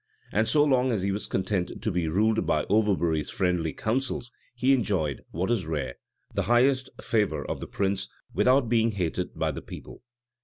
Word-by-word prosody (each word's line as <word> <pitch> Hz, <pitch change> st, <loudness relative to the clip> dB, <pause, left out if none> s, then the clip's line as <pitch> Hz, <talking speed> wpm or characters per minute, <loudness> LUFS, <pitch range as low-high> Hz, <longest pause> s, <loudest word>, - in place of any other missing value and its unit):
And 110 Hz, +2 st, +2 dB
so 150 Hz, -1 st, +4 dB
long 130 Hz, -3 st, +3 dB
as 105 Hz, -5 st, -1 dB
he 100 Hz, -, +1 dB
was 100 Hz, +2 st, -2 dB
content 95 Hz, -1 st, -1 dB
to 110 Hz, -, -1 dB
be 90 Hz, -2 st, 0 dB
ruled 110 Hz, +7 st, +2 dB
by 75 Hz, -1 st, +2 dB
Overbury's 90 Hz, -8 st, +2 dB
friendly 90 Hz, -6 st, 0 dB
counsels, 125 Hz, 0 st, -2 dB, 0.2 s
he 130 Hz, +2 st, +3 dB
enjoyed 95 Hz, -, 0 dB
what 95 Hz, +7 st, -2 dB
is 100 Hz, -9 st, 0 dB
rare 70 Hz, -6 st, -2 dB, 0.4 s
the 100 Hz, -, 0 dB
highest 130 Hz, +2 st, +3 dB
favor 105 Hz, -3 st, 0 dB
of -, -, -4 dB
the -, -, -6 dB
prince, 100 Hz, -1 st, -1 dB, 0.2 s
without 130 Hz, 0 st, +4 dB
being 115 Hz, -1 st, +2 dB
hated 90 Hz, -1 st, -2 dB
by -, -, 0 dB
the -, -, -6 dB
people. -, -, -10 dB
105 Hz, 180 wpm, -27 LUFS, 90-120 Hz, 0.4 s, so